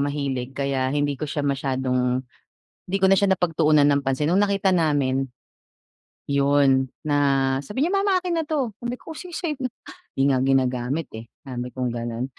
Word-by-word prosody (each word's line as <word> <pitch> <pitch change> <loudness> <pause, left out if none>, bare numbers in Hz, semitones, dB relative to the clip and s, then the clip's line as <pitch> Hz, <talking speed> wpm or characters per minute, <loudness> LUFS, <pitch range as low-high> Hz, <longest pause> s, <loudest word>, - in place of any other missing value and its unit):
mahilig 140 -3 -2
kaya 135 -2 0
hindi 145 0 0
ko 155 - -4
siya 145 0 -2
masyadong 130 -2 0 0.7
'di 190 +2 0
ko - - +5
na - - +7
siya 200 -1 +3
napagtuunan 155 -4 +3
ng 140 0 +2
pansin 135 +3 0
no'ng 185 - +4
nakita 200 -1 +1
namin, 140 -5 +1 1.0
'yon, 140 -1 +3 0.2
na 145 -1 +2 0.5
sabi 235 - -1
niya, 355 - -1
"Mama 395 -1 +3
akin 350 -2 -1
na - - -6
'to," 275 -8 -1
sabi 240 +1 -2
ko, - - -10
"O, - - -9
sige 360 -2 -9
sayo 330 -4 -2
na. 255 - -1 0.5
'Di 135 - +2
nga 130 - +2
ginagamit, 130 +2 +1
eh," 110 +1 -8 0.2
sabi 125 -1 -4
kong 125 -1 -1
gano'n. 120 0 -3
140 Hz, 180 wpm, -23 LUFS, 130-190 Hz, 1.0 s, na